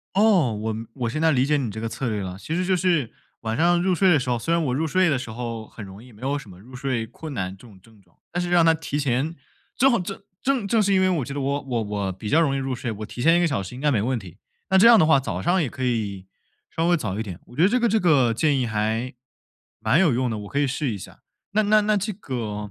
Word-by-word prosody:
哦， 195 - +4
我 110 +1 -3 0.2
我 120 -3 -3
现 155 - -3
在 160 0 +4
理 130 -2 +2
解 150 +2 +2
你 130 -6 -2
这 110 - -6
个 115 - -3
策 120 +3 -3
略 105 -3 -2
了。 90 0 -6
其 155 - -5
实 180 +2 0
就 185 0 +2
是 170 -9 +1 0.3
晚 110 -1 -3
上 175 +4 +3
入 185 0 +2
睡 185 +1 +4
的 155 - +5
时 125 -1 -3
候 120 - +1
虽 165 +9 -1
然 170 - +1
我 125 - 0
入 160 +4 0
睡 185 +3 +2
的 140 -4 +1
时 125 - -7
候 115 -1 -5
很 110 - -10
容 95 +2 -11
易， 125 -1 -15
没 105 +4 -18
有 140 +2 -1
什 115 - -12
么 90 - -13
入 125 +4 -15
睡 125 -3 -2
困 155 +5 -9
难 95 -4 -3
这 95 - -16
种 100 -5 -17
症 110 +1 -21
状。 90 -3 -30 0.2
但 175 - -1
是 175 - -2
让 175 -1 +5
它 165 - +6
提 150 -2 -4
前 140 +3 0 0.4
正 270 +2 +5
好 235 - +2
正 195 +2 -6 0.2
正 260 -6 0
正 225 +2 +3
是 200 -1 +2
因 190 - +4
为， 185 - +3
我 155 -8 0
觉 140 - -6
得 145 - -3
我 140 +1 -1
我 125 -4 -2
我 100 -2 -3
比 95 +4 -7
较 160 - +4
容 145 -4 +2
易 - - -1
入 135 -1 -2
睡， 120 -1 -4
我 105 0 -7
提 120 - -7
前 165 +2 +5
1 - - +3
个 175 - +3
小 135 -11 -1
时 95 +6 -8
应 125 - -8
该 150 +1 +2
没 120 -7 +1
问 125 +5 0
题。 95 -5 -9 0.3
那 190 - +5
这 205 - +7
样 235 -2 +9
的 - - +5
话， 155 -3 +5
早 100 -8 -4
上 180 - +2
也 150 - 0
可 130 - -8
以 105 -6 -2 0.4
稍 165 +1 -1
微 175 - +4
早 100 - -3
一 110 - -1
点。 95 -5 -8
我 120 - -15
觉 160 - +2
得 185 - +6
这 250 +4 +1
个 235 - +3
这 220 +1 +2
个 140 - +3
建 140 +5 +1
议 125 - 0
还 110 +3 -2 0.7
蛮 155 - +2
有 170 -9 +4
用 125 0 0
的， 110 - -3
我 105 -1 -8
可 140 - -1
以 145 - +2
试 135 +1 -2
一 - - -4
下。 - - -12 0.3
那 215 +2 +2
那 215 +1 +5
那 210 0 +1
这 205 +2 -2
个 110 - -5
135 Hz, 330 characters per minute, -23 LUFS, 110-170 Hz, 0.7 s, 样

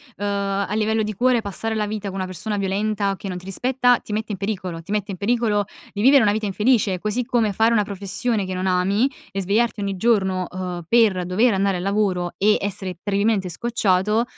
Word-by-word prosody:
Uhm, 205 - -4
a 200 0 -1
livello 220 0 +1
di 215 0 -3
cuore, 245 +3 +2
passare 220 +2 -3
la 215 -1 0
vita 210 -1 -4
con 195 - -5
una 190 -1 -2
persona 185 +4 -4
violenta, 200 0 -1
che 205 - -7
non 180 -2 -4
ti 180 - -10
rispetta, 245 +5 +2
ti 210 - -8
mette 215 +1 -2
in 195 - -3
pericolo, 185 -4 -4
ti 200 +5 -6
mette 205 -1 -1
in 185 - -6
pericolo 210 -1 +1 0.3
vivere 260 +6 +5
una 205 - +4
vita 215 +1 -1
infelice, 210 -2 +1
così 215 +5 -1
come 235 -5 +1
fare 225 +4 +2
una 210 -2 +3
professione 200 +2 -2
che 185 - -4
non 185 +1 -3
ami 190 +7 +2 0.2
e 195 +1 -2
svegliarti 210 +3 +1
ogni 195 -1 -2
giorno, 190 -4 +1
uhm, 180 -2 -5
per 210 -6 +3
dover 210 +7 +2
andare 195 0 +1
al 175 - -4
lavoro 195 -3 0
e 210 +2 +4
essere 195 -2 -4
terribilmente 200 -2 +1
scocciato, 210 0 +1
205 Hz, 210 wpm, -22 LUFS, 190-220 Hz, 0.3 s, vivere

